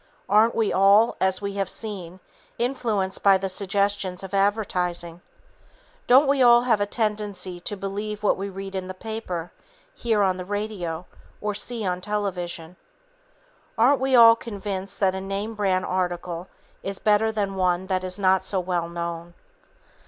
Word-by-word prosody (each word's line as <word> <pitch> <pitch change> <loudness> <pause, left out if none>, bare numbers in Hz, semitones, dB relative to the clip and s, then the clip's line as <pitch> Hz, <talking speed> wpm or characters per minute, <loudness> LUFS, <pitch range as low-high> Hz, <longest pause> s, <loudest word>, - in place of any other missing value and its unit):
Aren't 215 +3 +4
we 225 -2 +1
all, 200 +4 +5
as 190 +1 +1
we 200 0 -2
have 190 - -2
seen, 190 -5 -6 0.4
influenced 225 -6 -1
by 195 -1 +6
the 190 0 -3
suggestions 200 -1 -1
of 190 0 -8
advertising? 180 -4 0 0.9
Don't 265 +4 +6
we 275 -1 +2
all 240 -1 +7
have 225 -4 +2
a 205 - +1
tendency 205 -5 -2
to 205 +4 -4
believe 205 +2 -5
what 205 - +3
we 195 +1 -4
read 195 0 -7
in 190 -1 -4
the 185 - -7
paper, 185 -5 -5 0.4
hear 225 - +1
on 185 -1 +1
the 180 - -5
radio 190 -4 -4 0.3
or 210 0 -2
see 220 +1 -3
on 180 -1 -1
television? 180 -4 -4 1.0
Aren't 255 +4 +4
we 265 0 +2
all 230 -1 +9
convinced 200 -4 -5
that 190 -2 +3
a 190 - -4
name 195 +3 -4
brand 190 -3 0
article 180 -1 -3 0.3
is 195 0 -4
better 215 +1 +2
than 205 -3 -2
one 185 -1 0
that 185 -1 -1
is 185 +1 -4
not 190 -2 +3
so 190 0 0
well 175 -2 -2
known? 170 0 -5
195 Hz, 160 wpm, -24 LUFS, 185-210 Hz, 1.0 s, all